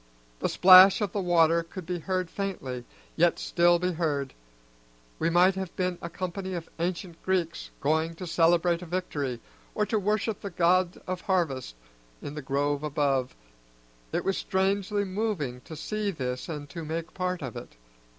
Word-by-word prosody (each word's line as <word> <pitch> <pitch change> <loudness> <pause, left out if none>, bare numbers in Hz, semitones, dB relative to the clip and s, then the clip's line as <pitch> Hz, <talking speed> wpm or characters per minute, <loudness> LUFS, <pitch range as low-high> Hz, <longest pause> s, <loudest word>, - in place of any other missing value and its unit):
The - - 0
plash 185 +1 +8
of 205 -4 -1
the 200 - -2
water 170 -2 +4
could 170 +2 -9
be 180 0 -3
heard 185 0 -2
faintly, 135 -11 -4 0.3
yet - - +3
still 175 0 +3
be 180 +1 -1
heard; 150 -5 -1 0.9
we 165 - +2
might 180 +3 +5
have 190 -2 -5
been 180 -1 -1
a 170 - -5
company 185 +1 -4
of 165 -1 -5
ancient 170 0 -3
Greeks 180 -3 -1
going 160 +3 +1
to 180 - -7
celebrate 170 +1 +3
a 180 - -8
victory, 145 -8 -3 0.4
or 210 - +1
to 215 0 0
worship 210 +2 -1
the 200 - -4
god 180 0 +2
of 185 -1 -4
harvests, 155 - -1 0.4
in 145 - -7
the 150 - -5
grove 140 +1 0
above. 140 -4 0 0.8
It - - -2
was 195 - 0
strangely 200 +2 0
moving 185 - -2
to 160 - -8
see 210 +6 -2
this 130 -7 -4
and 150 -3 -5
to 165 -2 -6
make 160 +2 -4
part 180 -3 -2
of 130 -4 -6
it. - - -9
175 Hz, 170 wpm, -28 LUFS, 155-185 Hz, 0.9 s, plash